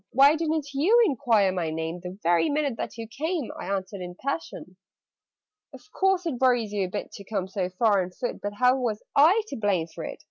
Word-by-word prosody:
Why 275 +4 +6
didn't 310 -3 -2
you 360 +13 +4
enquire 225 - +2
my 175 -3 -2
name 160 +2 -4
The 180 +1 -8
very 175 - +3
minute 290 -4 0
that - - -5
you 225 -1 -6
came?" 305 +4 -3
I - - -7
answered 195 0 -3
in 180 0 -6
a - - -22
passion. 180 -5 -4 1.0
"Of 420 - -17
course 385 -2 +1
it 270 -7 -3
worries 245 -5 +2
you 200 -2 0
a - - -10
bit - - -5
To 200 - -10
come 195 -2 -3
so 190 -1 -2
far 200 +1 +2
on 180 - -4
foot 245 +7 -5
But 205 0 -4
how 250 +3 +4
was 230 -5 -2
I 345 +10 +6
to - - -5
blame 200 -6 +1
for 165 - -9
it?" - - -6
220 Hz, 220 wpm, -26 LUFS, 185-285 Hz, 1.0 s, Why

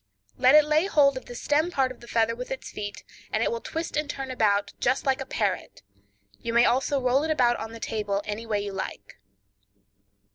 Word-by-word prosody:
Let 255 +3 +5
it 305 -1 +7
lay 310 +4 +2
hold 280 -7 +4
of 260 - -7
the 245 - -9
stem 300 +6 +1
part 265 -6 +1
of 255 - -11
the 235 - -14
feather 230 0 +1
with 250 +1 -7
its 265 - -6
feet, 205 -1 -6 0.3
and 220 - +1
it - - +1
will 230 0 -3
twist 325 +1 -4
and 300 -1 -1
turn 270 -2 -4
about 205 -4 +1
just 255 +2 +1
like 270 0 +1
a 270 - -5
parrot; 200 - -2 0.6
you 230 - -4
may 235 +1 +6
also 270 +3 +2
roll 255 +1 +2
it 320 - -2
about 245 -6 +3
on 220 0 -6
the 230 - -9
table 205 -3 -2
any 215 +2 -5
way 210 -2 0
you 200 - -5
like. 100 - -6
245 Hz, 220 wpm, -26 LUFS, 220-275 Hz, 0.6 s, it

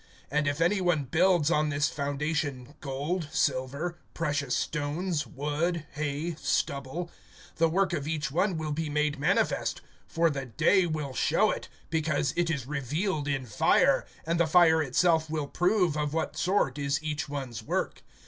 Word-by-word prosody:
(12)And 150 0 +1
if 145 +1 -1
any 190 +4 +2
one 175 -5 +2
builds 170 +3 +3
on 150 -2 +2
this 150 0 +1
foundation 145 -2 -2
gold, 150 +5 -2
silver, 140 +6 -1 0.2
precious 145 -5 0
stones, 150 0 -2
wood, 150 +6 -2
hay, 150 +3 -2
stubble; 140 +6 -1 0.5
(13)the 165 -1 +4
work 190 +1 +1
of 150 -4 -2
each 150 -3 -2
one 180 +3 +1
will 155 -1 -3
be 155 +1 -2
made 150 0 0
manifest; 145 - +1 0.3
for 165 0 +2
the 135 -2 -4
day 180 - +3
will 150 -4 -3
show - - +2
it, - - -5 0.2
because 155 -4 0
it 170 -1 +1
is 140 -7 -2
revealed 150 - -2
in 135 -2 -1
fire, 110 - +3 0.2
and 165 +1 0
the 170 - +3
fire 160 -1 +5
itself 160 +3 +2
will 155 -2 -1
prove 180 +1 +1
of 150 0 -1
what 160 - -1
sort 175 -8 +1
is 140 +2 -1
each 150 -2 -3
one's 130 -6 -5
work. 110 - -2
150 Hz, 160 wpm, -28 LUFS, 140-170 Hz, 0.5 s, fire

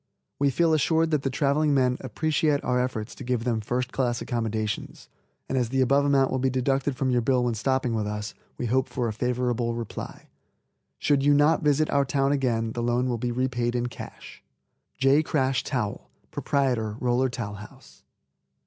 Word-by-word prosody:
We 140 0 +3
feel 165 +4 +2
assured 160 +1 +2
that 150 -3 +2
the 135 - -1
traveling 145 +2 +1
men 125 -2 +2
appreciate 150 +3 0
our 125 0 +1
efforts 120 -3 -3
to - - -10
give 125 -2 -1
them 115 -2 0
first 125 +3 -2
class 120 -2 0
accommodations, 110 -3 -3 0.4
and 130 - 0
as 120 -2 0
the 135 +2 -1
above 140 +2 +3
amount 135 -2 +3
will 130 - 0
be 130 +1 +1
deducted 135 +2 0
from 130 0 0
your 125 -1 +2
bill 125 +1 +2
when 120 -1 0
stopping 130 +2 0
with 110 -2 -1
us, 105 0 -4 0.2
we - - -3
hope 130 +3 +1
for 125 -2 -2
a 110 - -2
favorable 120 0 -1
reply. 115 -2 -7 0.7
Should 145 -2 +2
you 145 +1 +4
not 150 +2 +4
visit 150 +1 +2
our 140 - +3
town 135 0 +1
again 120 -5 0
the 120 - -4
loan 120 +2 +1
will 120 -2 -1
be 120 +1 -1
repaid 120 -1 -1
in 120 0 0
cash. - - -10 0.6
J. 135 +3 +4
KRASH 135 -5 0
TOWEL, 120 -7 -3 0.2
Proprietor 120 -6 0
Roller 125 +1 +1
Towel 115 -4 -5
House. 105 0 -14
125 Hz, 185 wpm, -26 LUFS, 120-140 Hz, 0.7 s, you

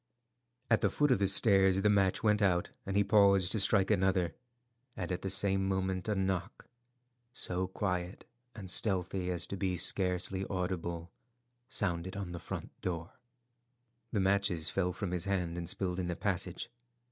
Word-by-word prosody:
At 115 - +4
the - - +3
foot 145 -2 +2
of 115 - +3
the 100 - +2
stairs 95 -1 +4
the - - +4
match 100 -1 +2
went 105 -1 +3
out, 90 -3 +2 0.2
and 100 0 0
he 100 - +5
paused 100 -3 +4
to 110 - +1
strike 95 0 +4
another; 95 -2 +2 0.6
and 90 0 -3
at 90 - -2
the 95 - -3
same 95 0 0
moment 95 0 -1
a 105 - +1
knock, 95 0 -2 0.7
so 90 -3 -1
quiet 90 -1 -3 0.3
and 95 -4 -5
stealthy 90 -2 0
as 90 -1 -1
to 100 - -5
be 95 -2 -1
scarcely 95 +1 0
audible, 85 -3 -3 0.6
sounded 95 -5 -2
on 95 -3 -4
the 85 - -6
front - - -6
door. 85 -2 -4 1.0
The 105 - 0
matches 95 -4 +1
fell 90 -2 0
from 90 0 -4
his 90 -1 -1
hand 90 -4 -1
and 85 -1 -2
spilled 90 -1 -1
in 90 - -2
the 90 - -2
passage. 95 +3 -3
95 Hz, 170 wpm, -32 LUFS, 90-100 Hz, 1.0 s, he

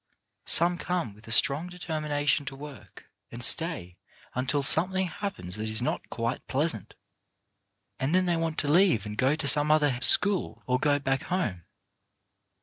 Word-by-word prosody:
Some 175 +1 +2
come 175 - -3
with 105 +3 -19
a - - -8
strong 140 +8 +2
determination 155 -5 -2
to 135 - -6
work, 140 -6 -13 0.3
and 120 +1 -8
stay 155 - +2 0.4
until 135 +3 -2
something 185 +7 +3
happens 170 - -7
that 110 +1 -4
is 110 - +1
not 120 - -4
quite 115 +1 -4
pleasant, 135 - -2 1.0
and 140 +6 -1
then 185 0 +2
they 175 -1 0
want 165 -1 -3
to 145 - -1
leave 160 - +2
and 105 0 -7
go 130 +6 +1
to 155 -2 -3
some 145 +3 +5
other 150 -5 +1
school 200 +4 +4
or 125 0 0
go 145 +1 +1
back 135 -1 -2
home. 105 - -3
145 Hz, 160 wpm, -26 LUFS, 125-170 Hz, 1.0 s, some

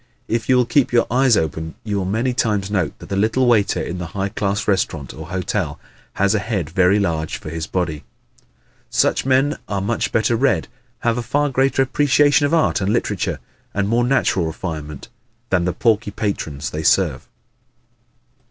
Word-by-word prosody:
If 115 +1 -2
you 130 - +6
will 125 - +3
keep 120 +3 +2
your 120 -1 +3
eyes 125 -2 +4
open 80 0 -2
you 105 -2 -2
will 95 - -1
many 115 +7 0
times 105 -5 0
note 90 -7 -1
that - - -12
the 100 - -2
little 110 +6 +2
waiter 110 -5 +3
in 90 +1 -4
the 90 - -4
high 100 +1 0
class 100 0 -2
restaurant 85 - -1
or 80 0 -9
hotel 90 -4 -2 0.3
has 100 +1 +2
a 105 - +2
head 95 -7 -3
very 95 +2 +3
large 80 -6 -1
for 75 - -8
his 80 -1 -4
body. 80 -5 -2 0.9
Such - - +1
men 135 +3 +2
are 100 - -2
much 105 +4 -1
better 110 +1 +2
read, 135 +4 +1 0.3
have 115 0 +1
a - - -1
far 145 +5 0
greater 135 0 +2
appreciation 145 +1 +3
of 145 - -3
art 160 -9 +2
and 95 +2 +1
literature 105 -4 -1 0.4
and 100 0 +1
more 120 +3 +2
natural 120 -9 +1
refinement 75 -2 -6 0.4
than 90 -2 +2
the 90 - +1
porky 110 -3 +1
patrons 80 -9 -3
they 75 - -3
serve. - - +1
100 Hz, 180 wpm, -20 LUFS, 90-120 Hz, 0.9 s, you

